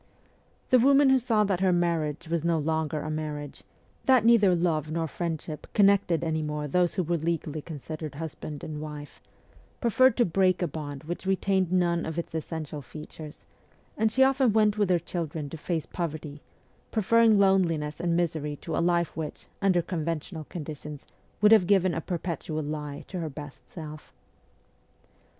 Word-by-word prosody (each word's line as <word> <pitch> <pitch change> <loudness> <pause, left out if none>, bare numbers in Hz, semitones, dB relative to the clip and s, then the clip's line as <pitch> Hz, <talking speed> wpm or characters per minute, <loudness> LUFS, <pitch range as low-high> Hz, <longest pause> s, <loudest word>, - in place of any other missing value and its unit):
The 255 - +7
woman 275 +2 +5
who 265 - +5
saw 225 -3 +2
that 195 -3 0
her 190 -1 +3
marriage 170 -2 0
was 165 -1 -1
no 170 -1 +2
longer 155 0 -1
a 155 - -4
marriage 150 -2 -5 0.5
that 255 -4 +5
neither 210 -6 +6
love 160 -3 0
nor 165 +1 -1
friendship 160 -1 -5
connected 200 -5 +4
any 160 -1 0
more 150 -1 -3
those 175 +4 +1
who 185 - +1
were 170 +1 0
legally 160 -1 -2
considered 155 -1 -7
husband 155 -1 -6
and 150 -1 -5
wife 150 -1 -8 0.6
preferred 250 +1 +4
to 240 - +4
break 185 +1 +2
a - - +1
bond 145 -2 -6
which 175 +4 -5
retained 190 -1 +1
none 175 -2 +2
of 160 0 -5
its 170 - -4
essential 155 -2 -5
features; 150 +2 -10 0.5
and 220 0 +1
she 265 +4 +4
often 265 -4 +3
went 210 -1 +4
with 205 -3 +1
her 180 - +4
children 160 -3 -4
to - - -5
face 160 0 -2
poverty, 155 -3 -5 0.5
preferring 225 0 +4
loneliness 170 -6 +2
and 170 -1 +1
misery 155 -4 -1
to 160 +2 -5
a - - +1
life 170 -1 +1
which, 155 -1 -6 0.2
under 185 -3 +3
conventional 165 -1 -4
conditions, 150 -2 -7 0.4
would 210 0 +6
have 210 -6 +6
given 190 -3 +3
a 165 - -2
perpetual 165 -3 -3
lie 150 -1 -5
to 185 - -5
her 160 -2 -3
best 145 -2 -10
self. 155 -3 -9
165 Hz, 170 wpm, -27 LUFS, 155-190 Hz, 0.6 s, The